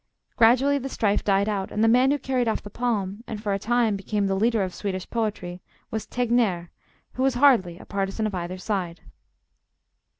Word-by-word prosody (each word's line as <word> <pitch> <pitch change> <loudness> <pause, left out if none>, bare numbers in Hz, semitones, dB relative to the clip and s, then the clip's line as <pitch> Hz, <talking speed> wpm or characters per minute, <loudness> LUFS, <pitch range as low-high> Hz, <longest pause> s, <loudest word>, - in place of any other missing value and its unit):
Gradually 260 +5 +4
the 270 +1 -5
strife 205 -5 0
died 200 0 +2
out, 200 -3 -2
and 215 - 0
the - - +5
man 250 +3 +5
who 290 - +2
carried 255 -3 -1
off 220 - -1
the 205 - -10
palm, 215 -3 -2
and 215 - -5
for 205 -2 -2
a 195 - -1
time 235 -1 +1
became 200 +1 -2
the 195 - 0
leader 220 +2 +2
of 185 -1 -4
Swedish 190 -3 -4
poetry, 205 -6 -3 0.3
was 220 -1 -4
Tegnèr, 230 -8 0 0.4
who 255 - -4
was 265 -1 +2
hardly 240 -11 +4
a - - -13
partisan 195 +2 -2
of 215 - -2
either 180 0 -4
side. 185 -3 -3
210 Hz, 195 wpm, -25 LUFS, 195-240 Hz, 0.4 s, the